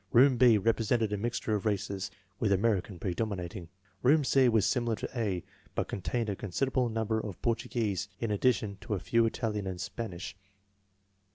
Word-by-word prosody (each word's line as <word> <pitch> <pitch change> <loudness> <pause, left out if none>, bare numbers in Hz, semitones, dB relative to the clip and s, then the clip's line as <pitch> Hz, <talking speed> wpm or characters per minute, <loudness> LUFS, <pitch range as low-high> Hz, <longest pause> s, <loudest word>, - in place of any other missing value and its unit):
Room 130 +2 +6
B 120 -2 +6
represented 115 +1 +1
a - - 0
mixture 115 0 -2
of 105 - 0
races, 100 -2 -1 0.3
with 105 - +1
American 100 -2 +1
predominating. 95 -1 -3 0.3
Room 145 +4 +5
C 130 -1 +4
was 110 -3 +3
similar 120 -2 +1
to - - -4
A, 100 -7 -1 0.3
but - - 0
contained 100 +6 -2
a 100 - -1
considerable 125 +6 0
number 110 0 0
of 105 -4 -6
Portuguese, 110 -5 -1
in 115 -2 -1
addition 105 -2 +1
to 105 - -2
a - - -2
few 115 +3 +2
Italian 105 -3 -2
and 90 -1 -4
Spanish. 95 0 -5
110 Hz, 165 wpm, -30 LUFS, 100-115 Hz, 0.3 s, Room